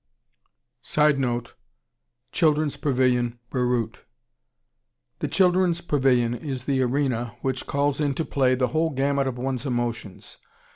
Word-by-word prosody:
[Sidenote: 135 Hz, -6 st, +1 dB, 0.8 s
Children's 155 Hz, -2 st, +2 dB
Pavilion, 125 Hz, -3 st, +1 dB
Beirut.] 125 Hz, -3 st, -1 dB, 1.2 s
The -, -, -1 dB
Children's 180 Hz, -2 st, +2 dB
Pavilion 130 Hz, -7 st, +2 dB
is 130 Hz, -1 st, -5 dB
the 135 Hz, -2 st, +1 dB
arena 125 Hz, -2 st, -1 dB
which 130 Hz, -1 st, -2 dB
calls 140 Hz, +1 st, 0 dB
into 145 Hz, +2 st, 0 dB
play 130 Hz, -2 st, +2 dB
the 125 Hz, 0 st, 0 dB
whole 160 Hz, +1 st, +1 dB
gamut 140 Hz, -1 st, 0 dB
of 125 Hz, -2 st, -3 dB
one's 130 Hz, 0 st, -3 dB
emotions. 120 Hz, -6 st, -4 dB
130 Hz, 110 wpm, -24 LUFS, 125-145 Hz, 1.2 s, Children's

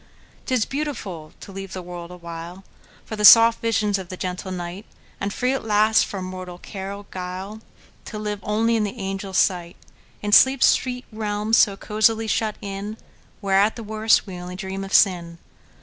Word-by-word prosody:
'T 260 Hz, -, +1 dB
is 225 Hz, -, +2 dB
beautiful 215 Hz, -, -5 dB
to -, -, -11 dB
leave 195 Hz, 0 st, -8 dB
the 185 Hz, -, -5 dB
world 175 Hz, -1 st, -8 dB
awhileFor 170 Hz, +1 st, -9 dB, 0.5 s
the 215 Hz, -1 st, -4 dB
soft 230 Hz, +2 st, +8 dB
visions 210 Hz, -3 st, +1 dB
of 185 Hz, -2 st, -8 dB
the 185 Hz, -, -7 dB
gentle 185 Hz, +1 st, -4 dB
night; 180 Hz, +2 st, -6 dB, 0.4 s
And 200 Hz, -, -2 dB
free, 250 Hz, +5 st, 0 dB
at 270 Hz, -, -3 dB
last, 215 Hz, 0 st, +3 dB
from 190 Hz, -2 st, -5 dB
mortal 185 Hz, -1 st, -7 dB
care 195 Hz, +1 st, -7 dB
or 200 Hz, 0 st, -8 dB
guile, 185 Hz, +4 st, -6 dB, 0.4 s
To 215 Hz, -, -7 dB
live 210 Hz, -1 st, -3 dB
as -, -, -9 dB
only 225 Hz, +2 st, +2 dB
in 220 Hz, -, +1 dB
the 210 Hz, +3 st, -4 dB
angels' 195 Hz, -1 st, -4 dB
sight, 175 Hz, -3 st, +1 dB, 0.5 s
In 205 Hz, -, -2 dB
sleep's 265 Hz, +4 st, +6 dB
sweet 250 Hz, 0 st, +1 dB
realm 215 Hz, 0 st, -3 dB
so 205 Hz, -3 st, +5 dB
cosily 220 Hz, +2 st, +1 dB
shut 215 Hz, 0 st, 0 dB
in, 200 Hz, +2 st, -5 dB, 0.4 s
Where, 195 Hz, -1 st, +2 dB
at 210 Hz, +2 st, +3 dB
the 230 Hz, -, -7 dB
worst, 220 Hz, +1 st, +2 dB
we 185 Hz, -3 st, -8 dB
only 180 Hz, +1 st, -7 dB
dream 190 Hz, 0 st, -5 dB
of 195 Hz, -, -8 dB
sin! 170 Hz, -4 st, +3 dB
200 Hz, 185 wpm, -23 LUFS, 185-220 Hz, 0.5 s, soft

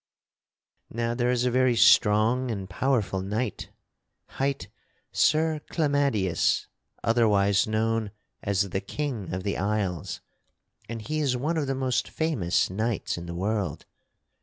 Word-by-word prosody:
"Now 115 Hz, 0 st, -2 dB
there 120 Hz, 0 st, 0 dB
is 125 Hz, 0 st, +1 dB
a 125 Hz, -, +2 dB
very 130 Hz, 0 st, +3 dB
strong 115 Hz, +3 st, +4 dB
and 100 Hz, -4 st, -4 dB
powerful 105 Hz, -3 st, 0 dB
knight 105 Hz, +3 st, -3 dB, 0.6 s
hight 140 Hz, 0 st, -2 dB, 0.4 s
Sir 155 Hz, 0 st, +2 dB
Clamadius, 140 Hz, -, +1 dB, 0.4 s
otherwise 105 Hz, -4 st, +3 dB
known 110 Hz, 0 st, 0 dB, 0.3 s
as 100 Hz, -1 st, 0 dB
the 95 Hz, -, -1 dB
King 130 Hz, -, -4 dB
of 95 Hz, 0 st, -3 dB
the 100 Hz, 0 st, -2 dB
Isles; 100 Hz, -4 st, -2 dB, 0.7 s
and 115 Hz, -1 st, -5 dB
he 155 Hz, +6 st, -2 dB
is 135 Hz, -4 st, +1 dB
one 150 Hz, +7 st, -1 dB
of 150 Hz, -3 st, -1 dB
the 135 Hz, -, -1 dB
most 130 Hz, -2 st, 0 dB
famous 140 Hz, -, 0 dB
knights 110 Hz, +3 st, -2 dB
in 85 Hz, 0 st, -7 dB
the 85 Hz, -, -5 dB
world. 100 Hz, +1 st, -2 dB
115 Hz, 135 wpm, -26 LUFS, 100-130 Hz, 0.7 s, strong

